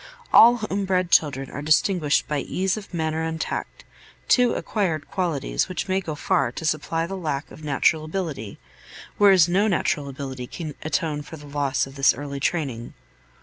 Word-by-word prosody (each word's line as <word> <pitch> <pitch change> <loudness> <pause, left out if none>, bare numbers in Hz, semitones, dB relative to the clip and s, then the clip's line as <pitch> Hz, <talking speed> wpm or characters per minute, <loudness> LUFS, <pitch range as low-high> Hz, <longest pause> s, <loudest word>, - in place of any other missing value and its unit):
All 235 +2 +9
home 205 -3 -2
bred 185 -2 0
children 135 -3 +2
are 140 - -6
distinguished 155 0 +2
by 150 -1 -1
ease 185 +6 -1
of 215 -2 -9
manner 160 -2 -1
and 160 0 -3
tact, - - -4 0.4
two 245 -2 +4
acquired 170 -9 -2
qualities 170 -4 -1
which 185 - -3
may 190 0 +1
go 160 -5 -5
far 135 -3 +1
to 160 - -6
supply 160 +1 0
the 195 +3 -5
lack 155 -6 -3
of 155 - -12
natural 150 +2 +1
ability, 155 - -4 0.6
whereas 190 -5 +6
no 195 +5 +2
natural 150 -7 0
ability 130 -2 -6
can 155 0 -6
atone 155 -1 -1
for 160 +2 -10
the 145 - -12
loss 145 -1 -1
of 135 - -12
this 135 - +4
early 140 -1 -6
training. 135 -7 -2
155 Hz, 175 wpm, -24 LUFS, 145-185 Hz, 0.6 s, All